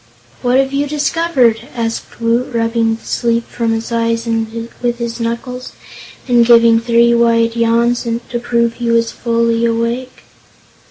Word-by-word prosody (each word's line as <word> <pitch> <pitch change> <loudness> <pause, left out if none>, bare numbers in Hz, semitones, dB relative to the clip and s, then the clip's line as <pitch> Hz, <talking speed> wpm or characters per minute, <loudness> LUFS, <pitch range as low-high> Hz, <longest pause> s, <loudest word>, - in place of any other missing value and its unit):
"What 250 +1 +2
have 270 0 +1
you 285 +1 0
discovered?" 290 -6 +1
asked 230 -1 -4
Woot, 235 +2 0
rubbing 230 -1 +1
the 225 - -16
sleep 235 -1 0
from 230 -1 -2
his 225 +1 -3
eyes 230 0 0
with 230 +1 -3
his 235 0 -4
knuckles 245 +2 -4 0.5
and 240 -2 +4
giving 230 -1 +5
three 235 0 +3
wide 230 -1 +2
yawns 235 +1 +2 0.3
to 240 - -3
prove 235 -1 0
he 235 0 -4
was 230 0 +2
fully 230 0 0
awake. 235 +2 -2
235 Hz, 145 wpm, -15 LUFS, 230-240 Hz, 0.5 s, giving